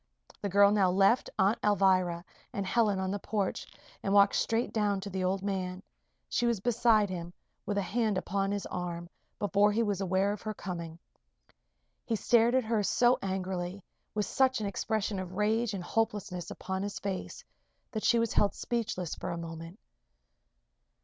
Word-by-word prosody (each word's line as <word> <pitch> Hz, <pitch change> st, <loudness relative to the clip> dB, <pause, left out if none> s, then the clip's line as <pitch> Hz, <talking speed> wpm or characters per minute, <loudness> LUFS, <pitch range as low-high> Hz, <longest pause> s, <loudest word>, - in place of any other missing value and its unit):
The 200 Hz, -, -2 dB
girl 200 Hz, +1 st, +6 dB
now 200 Hz, -3 st, +3 dB
left 195 Hz, +6 st, +3 dB
Aunt 200 Hz, +4 st, +2 dB
Alvirah 185 Hz, -4 st, +2 dB, 0.3 s
and 200 Hz, -, -2 dB
Helen 210 Hz, -1 st, +2 dB
on 190 Hz, 0 st, -1 dB
the 205 Hz, -, -2 dB
porch 200 Hz, -1 st, -2 dB, 0.3 s
and 195 Hz, -, -2 dB
walked 200 Hz, 0 st, +6 dB
straight 225 Hz, +2 st, 0 dB
down 205 Hz, -3 st, +1 dB
to 200 Hz, +1 st, -6 dB
the 185 Hz, 0 st, -2 dB
old 190 Hz, +1 st, 0 dB
man. 190 Hz, -1 st, -3 dB, 0.4 s
She 240 Hz, -, 0 dB
was 235 Hz, -4 st, +1 dB
beside 225 Hz, -1 st, +3 dB
him, 175 Hz, -2 st, -5 dB, 0.4 s
with 205 Hz, -, -1 dB
a 200 Hz, -, +1 dB
hand 215 Hz, +1 st, 0 dB
upon 195 Hz, +1 st, -1 dB
his 205 Hz, -1 st, -2 dB
arm, 170 Hz, -1 st, -5 dB, 0.3 s
before 205 Hz, +1 st, +3 dB
he 225 Hz, +3 st, +1 dB
was 200 Hz, -3 st, -1 dB
aware 190 Hz, +1 st, +1 dB
of 210 Hz, -, -8 dB
her 215 Hz, -1 st, -4 dB
coming. 170 Hz, -4 st, -6 dB, 1.1 s
He 230 Hz, -, -1 dB
stared 235 Hz, +2 st, +3 dB
at 260 Hz, -, +3 dB
her 220 Hz, -1 st, +1 dB
so 240 Hz, +4 st, +3 dB
angrily 190 Hz, -1 st, -3 dB, 0.3 s
with 210 Hz, -1 st, +1 dB
such 260 Hz, -2 st, +2 dB
an 215 Hz, -, -3 dB
expression 205 Hz, 0 st, -1 dB
of 185 Hz, -1 st, -6 dB
rage 215 Hz, +3 st, +1 dB
and 185 Hz, -, -5 dB
hopelessness 200 Hz, -4 st, -2 dB
upon 190 Hz, 0 st, -4 dB
his 200 Hz, 0 st, -4 dB
face 195 Hz, -1 st, -5 dB, 0.5 s
that 220 Hz, -, -4 dB
she 235 Hz, -, +4 dB
was 230 Hz, -1 st, +1 dB
held 205 Hz, -, +2 dB
speechless 210 Hz, -8 st, -2 dB
for -, -, -5 dB
a 170 Hz, -, -3 dB
moment. 165 Hz, +2 st, -7 dB
200 Hz, 175 wpm, -30 LUFS, 185-215 Hz, 1.1 s, girl